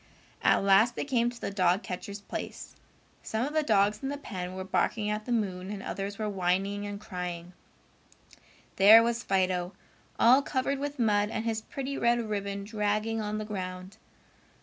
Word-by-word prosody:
At - - +3
last 200 +5 +5
they - - -3
came 240 -4 +1
to 240 -1 -10
the - - -4
dog 185 0 +2
catcher's 200 +2 -6
place. - - -7 0.5
Some 220 +3 -2
of 295 - -5
the 310 - +3
dogs 210 -6 +2
in 270 - -3
the 285 - -3
pen 185 -9 -6
were 190 - -4
barking 210 +2 0
at 210 0 -3
the 245 - -5
moon 190 -5 -1
and 200 -1 -6
others 200 +1 -4
were 215 - -2
whining 195 +1 -1
and 205 0 -6
crying. 180 -4 -6 1.2
There 215 +4 +9
was 235 0 0
Fido, 185 -3 0 0.4
all 255 +4 +6
covered 275 0 -1
with 290 +1 -4
mud, 210 -3 +2
and 220 0 -3
his 220 -1 -1
pretty 275 +4 -5
red 235 0 +3
ribbon 200 -1 -3
dragging 215 +1 -1
on 210 0 -3
the 215 - -4
ground. 185 -1 -6
210 Hz, 175 wpm, -29 LUFS, 195-230 Hz, 1.2 s, There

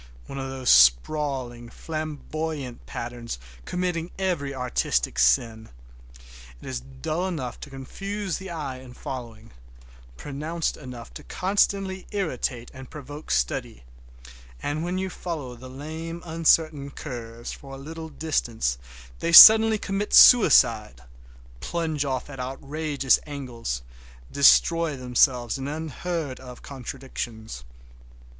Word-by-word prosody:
One 135 - -7
of 135 0 -4
those 130 -1 +1
sprawling 120 - +3
flamboyant 155 -2 -5
patterns 120 - -6 0.3
committing 180 -2 -2
every 175 -8 -1
artistic 120 - -1
sin. 110 - +2 0.9
It - - -12
is - - -3
dull 65 - -4
enough 135 -10 -5
to - - -9
confuse 195 +8 -5
the 190 0 -8
eye 145 -6 -5
in 125 -1 -13
following, 115 -4 -8 0.7
pronounced 155 +4 -3
enough 125 -5 -10
to - - -10
constantly 190 0 0
irritate, 130 - -3
and 130 -1 -11
provoke 145 +1 -10
study, - - -1 0.8
and 150 +2 -3
when 180 +2 -2
you 190 0 -3
follow 150 -10 -6
the 130 +2 -11
lame, 160 +5 -7
uncertain 160 -3 +2
curves 120 -5 -7
for 135 -1 -10
a - - -9
little 160 +3 -8
distance 120 - -1 0.4
they 170 - -1
suddenly 220 +4 +10
commit 200 0 -1
suicide—plunge 105 - +3
off 130 -2 -2
at 140 -2 -10
outrageous 140 +2 0
angles, 120 - -5 0.5
destroy 165 +2 +4
themselves 125 -1 +2
in 135 - -4
unheard 155 -1 -4
of 125 -2 -11
contradictions. 120 - -7
140 Hz, 115 wpm, -25 LUFS, 120-160 Hz, 0.9 s, suddenly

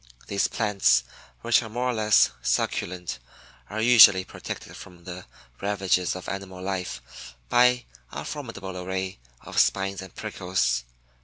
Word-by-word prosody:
These 100 -1 0
plants, 100 - +2 0.4
which 120 +1 +3
are 110 - -7
more 120 +3 -2
or - - -3
less 110 -2 +4
succulent, 90 +1 -2 0.5
are 110 - -4
usually 110 -5 +8
protected - - -8
from 90 -1 -13
the 90 +1 -9 0.3
ravages 95 -3 0
of 95 - -8
animal 95 -1 -6
life 90 -10 -6
by 125 0 +4 0.3
a 70 +2 -6
formidable 115 -10 -6
array 95 -2 -4 0.2
of - - -2
spines 95 0 +1
and 95 -1 -11
prickles. 75 -10 -1
95 Hz, 135 wpm, -26 LUFS, 90-110 Hz, 0.5 s, usually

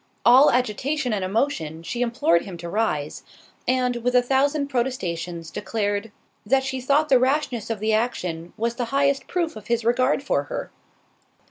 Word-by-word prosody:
All 255 +5 +8
agitation 250 +2 0
and 200 -3 -1
emotion, 185 - -1
she 240 +8 -4
implored 230 -9 +2
him 185 -3 -8
to 170 0 -7
rise, 155 -8 -1 0.5
and, 250 -1 +1
with 250 +1 -1
a 250 - +5
thousand 280 +3 +1
protestations, 175 - -3
declared, 205 +1 -2 0.3
"That 265 +5 +2
she 265 -1 -3
thought 285 +4 +2
the 260 - +6
rashness 255 -4 0
of 225 -2 -2
the 215 +1 0
action 180 -7 -2
was 230 +1 -1
the 245 - -1
highest 275 +2 +1
proof 340 -6 -1
of 215 - -10
his 235 -1 0
regard 255 +4 +2
for - - 0
her." - - -5
240 Hz, 165 wpm, -23 LUFS, 205-265 Hz, 0.5 s, All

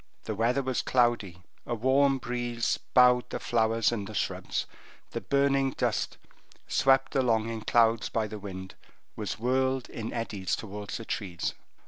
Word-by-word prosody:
The 110 - -3
weather 120 +6 +1
was 130 -1 0
cloudy, 115 -8 +1 0.2
a 120 - -1
warm 135 +4 +3
breeze 120 -2 -1 0.2
bowed 125 -1 +6
the - - -4
flowers 115 -1 +2
and 105 -4 -3
the 110 - -8
shrubs, - - -2 0.5
the - - -4
burning 140 -1 +2
dust, - - -1 0.5
swept 135 0 +3
along 115 -4 +2
in 115 -1 -4
clouds 115 0 +3
by 110 -1 0
the 105 0 -7
wind, 95 -2 -7 0.4
was 105 0 -4
whirled 130 +2 +1
in 115 -1 -5
eddies 105 -5 -2
towards 105 -1 -6
the 115 - -8
trees. 90 -7 -3
115 Hz, 150 wpm, -29 LUFS, 110-130 Hz, 0.5 s, bowed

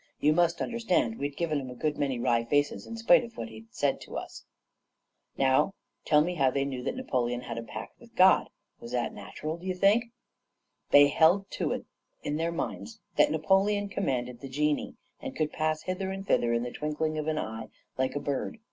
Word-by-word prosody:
You 150 +1 +4
must 170 +1 +2
understand 225 - +1
that - - -12
we'd 140 0 -3
given 155 -4 0
'em 130 - -7
a 125 - -8
good 150 +4 -1
many 140 -4 -1
wry 120 -1 +2
faces, 145 +4 0
in 230 - -6
spite 240 +3 +5
of 235 -1 -10
what 115 - -5
he 110 0 -10
had 110 - -16
said 140 +4 0
to - - -7
us. - - -7 0.9
"Now, 135 +9 +3 0.3
tell 150 -1 +5
me 175 +4 0
how 135 -6 +3
they 140 +1 0
knew 130 -2 -4
that 125 - -3
Napoleon 125 - -1
had 115 -1 -5
a - - -4
pact 115 - -8
with - - -18
God? - - +6 0.3
Was 120 +1 -9
that 120 -1 -1
natural, 150 +10 -6
d'ye 185 +2 -3
think? 200 +5 +4 0.8
"They 145 0 +8
held 175 +7 +4
to - - -1
it - - -5 0.4
in 145 - -1
their 165 +1 0
minds 220 +6 -5 0.2
that - - +6
Napoleon 195 +5 +2
commanded 125 -10 -2
the 135 - -7
genii, 150 +2 0 0.3
and - - -6
could 155 -1 -1
pass 155 0 -1
hither 185 +1 -3
and 195 0 -5
thither 120 -10 +2
in 120 0 +1
the 125 - -4
twinkling 155 +1 -2
of 155 - -3
an 155 -1 0
eye, 110 -4 -4 0.3
like 130 +1 0
a - - 0
bird. 140 - -3
150 Hz, 210 wpm, -29 LUFS, 125-180 Hz, 0.9 s, They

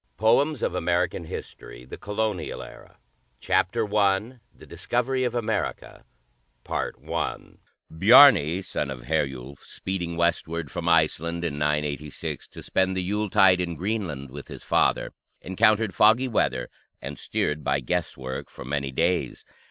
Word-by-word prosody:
POEMS 130 +6 +2
OF - - 0
AMERICAN 90 -1 0
HISTORY 60 -5 -9 1.5
CHAPTER 105 +2 0
I 105 +5 +1
THE - - -16
DISCOVERY 130 +2 -1
OF 125 -1 -2
AMERICA 115 -2 -3 0.6
Bjarni, 95 - +3
son 75 - -3
of 65 -3 -7
Herjulf, 70 -2 -2
speeding 85 -3 -5
westward 85 -2 -1
from 85 -1 -2
Iceland 85 +1 +1
in 75 -3 -3
986, 75 -1 -2
to - - -12
spend 95 0 0
the 95 - -1
Yuletide 95 -1 +3
in 85 -2 -3
Greenland 85 - -3
with 70 +1 -9
his - - -10
father, - - +1 0.3
encountered 110 +1 +2
foggy 110 +9 +4
weather 65 - -1 0.3
and - - -7
steered 75 0 -2
by 70 0 +1
guesswork 65 -3 -4
for - - -11
many 70 0 -2
days. 85 +6 -1
85 Hz, 120 wpm, -25 LUFS, 75-105 Hz, 1.5 s, foggy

